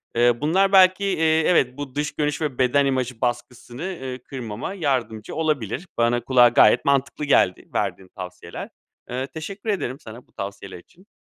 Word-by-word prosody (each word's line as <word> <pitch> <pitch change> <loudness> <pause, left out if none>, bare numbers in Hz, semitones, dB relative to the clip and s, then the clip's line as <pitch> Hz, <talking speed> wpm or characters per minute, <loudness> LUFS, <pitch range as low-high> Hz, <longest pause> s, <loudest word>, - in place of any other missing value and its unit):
Eee, 120 +1 +3
bunlar 190 +6 +2
belki, 190 0 +5
eee, 160 -4 +2
evet, 130 -7 +2
bu 145 -2 -7
dış 150 +1 -1
görünüş 150 0 -1
ve 145 -5 -2
beden 135 +2 +3
imajı 130 -3 -2
baskısını, 120 +2 -4
eee, 135 -9 -5
kırmama 120 - -6
yardımcı 125 - -2
olabilir. 150 - -2
Bana, 120 +1 +2
kulağa 125 -2 +5
gayet 110 -2 +5
mantıklı 140 +1 +1
geldi 95 -10 +2
verdiğin 95 - -2
tavsiyeler. 90 -2 -8 0.4
Eee, 130 +2 -3
teşekkür 195 +9 -7
ederim 145 - -2
sana 115 -1 -12
bu - - -33
tavsiyeler 100 -2 -7
için. 185 - -23
130 Hz, 160 wpm, -23 LUFS, 120-160 Hz, 0.4 s, belki